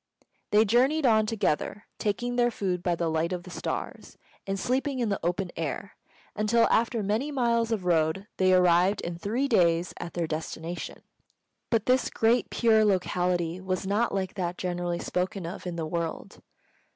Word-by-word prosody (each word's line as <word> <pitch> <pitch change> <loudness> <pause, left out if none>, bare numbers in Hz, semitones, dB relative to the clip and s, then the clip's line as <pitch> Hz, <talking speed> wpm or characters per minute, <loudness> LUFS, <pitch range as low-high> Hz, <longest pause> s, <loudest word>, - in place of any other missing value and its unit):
They 215 +1 +5
journeyed 265 +8 +3
on 220 -3 +4
together, 210 -2 -1 0.2
taking 240 +4 -1
their 240 0 +3
food 185 -6 -2
by 175 -1 0
the 170 0 -1
light 160 +2 0
of 180 -1 -3
the 180 - -11
stars, - - -5 0.3
and 195 0 -2
sleeping 265 +5 0
in 240 -3 0
the 200 - -1
open 180 +2 -1
air, 165 +5 -4 0.4
until, 215 +2 +3
after 230 -1 +2
many 215 +9 0
miles 235 -4 +1
of 205 -5 -1
road, 165 +2 +1
they 185 0 +3
arrived 180 +2 +4
in 170 0 -5
three 235 +9 0
days 175 -7 +2
at 175 - -7
their 170 -1 0
destination. 160 +2 -5 0.7
But 225 -2 +1
this 255 0 +2
Great 230 +2 +2
Pure 220 -2 +4
locality 180 -3 0
was 185 0 -2
not 210 +5 +1
like 190 -1 -2
that 180 -3 -3
generally 175 -1 -2
spoken 180 +1 -2
of 175 +2 -6
in 175 - -4
the 165 -1 -3
world. 165 0 -4
190 Hz, 170 wpm, -27 LUFS, 175-225 Hz, 0.7 s, They